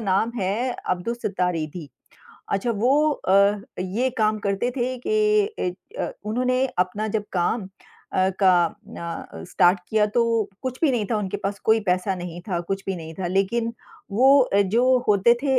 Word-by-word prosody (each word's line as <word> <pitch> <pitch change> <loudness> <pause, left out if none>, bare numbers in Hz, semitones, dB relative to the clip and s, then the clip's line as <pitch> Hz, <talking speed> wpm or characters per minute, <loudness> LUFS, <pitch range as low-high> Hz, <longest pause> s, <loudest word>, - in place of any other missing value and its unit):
नाम 210 +2 +1
है 210 +7 0
अब्दुल 185 +4 -3
सत्तार 180 -6 -1
ईधी। 155 0 -5 0.6
अच्छा 200 +5 0
वो 275 +8 +3
अ, 200 -4 +3 0.2
ये 215 +8 -1
काम 215 0 +2
करते 200 +5 0
थे 255 0 -1
कि 425 - +1 0.3
अ, - - -2
उन्होंने 255 +4 +1
अपना 195 +4 0
जब 210 0 -1
काम 190 +5 0 0.5
अ, 185 0 +2
का 180 -3 +5
अ, 165 - -8
स्टार्ट 180 +3 +4
किया। 215 -1 +3
तो 230 0 +1
कुछ 255 -1 -4
भी 310 - +4
नहीं 235 -5 0
था 225 - +2
उनके 205 -1 -2
पास, 200 0 -4
कोई 220 0 +4
पैसा 185 -1 0
नहीं 175 -1 -7
था, 175 -2 -1
कुछ 195 +3 -4
भी 195 - -2
नहीं 160 -1 -8
था। 185 0 -4
लेक़िन 200 +6 0 0.4
वो 265 +7 +6
अ, 205 -6 +2
जो 245 +6 +3
होते 210 +3 +5
थे, 270 -2 +3
205 Hz, 170 wpm, -23 LUFS, 185-240 Hz, 0.6 s, वो